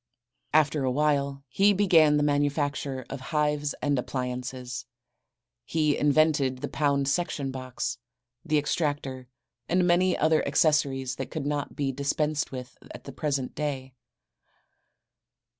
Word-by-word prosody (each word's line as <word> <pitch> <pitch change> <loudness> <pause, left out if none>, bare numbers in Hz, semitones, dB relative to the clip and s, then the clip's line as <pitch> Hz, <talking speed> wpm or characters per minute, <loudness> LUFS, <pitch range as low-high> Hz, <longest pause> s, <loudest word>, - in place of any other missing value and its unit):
After 150 -2 +3
a 130 - +1
while 140 0 0
he 200 +10 +3
began 165 -7 +5
the 145 - +2
manufacture 145 -2 0
of 135 - -6
hives 150 0 0
and 145 -2 +2
appliances. 125 -1 -4 0.8
He 155 +3 +1
invented 145 -3 +2
the 145 - -2
pound 140 -2 +1
section 140 -3 -1
box, 130 -2 -4 0.4
the 155 -3 +1
extractor 145 -4 -2 0.4
and 180 +1 +3
many 180 +1 +3
other 155 0 +3
accessories 140 -3 +1
that - - -4
could 155 -3 -4
not 145 -1 -2
be 140 -2 -1
dispensed 145 +2 -1
with 125 -2 -8
at - - -10
the - - -8
present 140 -4 -2
day. 135 -3 -4
145 Hz, 125 wpm, -27 LUFS, 135-150 Hz, 0.8 s, began